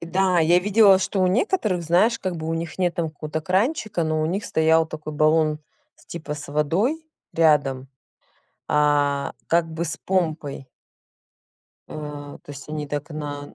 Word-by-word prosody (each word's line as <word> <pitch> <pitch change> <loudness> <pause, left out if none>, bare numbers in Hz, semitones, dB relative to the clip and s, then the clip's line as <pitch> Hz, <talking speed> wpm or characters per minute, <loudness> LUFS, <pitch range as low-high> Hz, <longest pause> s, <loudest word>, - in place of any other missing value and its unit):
Да, 185 +2 +1
я 170 +2 +5
видела, 200 0 +5
что 195 0 -1
у 185 - +4
некоторых, 205 - +1
знаешь, 185 +8 +3
как 185 -2 -3
бы 160 0 -5
у 165 - -1
них 165 +1 -5
нет 175 -2 +1
там 165 -2 -2
какого-то 155 +1 -5
кранчика, 200 - 0
но 155 0 0
у - - +1
них 190 +6 -2
стоял 160 0 +3
такой 155 -1 -7
баллон 155 0 +2 0.5
типа 155 -3 -5
с 150 -1 -9
водой 195 - 0 0.3
рядом, 145 -5 +2 0.8
а, 145 -1 +2
как 165 -1 +1
бы 160 +2 -3
с 155 -1 -4
помпой. 155 -7 -2 1.2
А, 145 -1 -8
то - - -12
есть 140 +1 -10
они 150 -1 -4
так 145 +2 -4
на 145 -1 -6
160 Hz, 160 wpm, -23 LUFS, 150-185 Hz, 1.2 s, я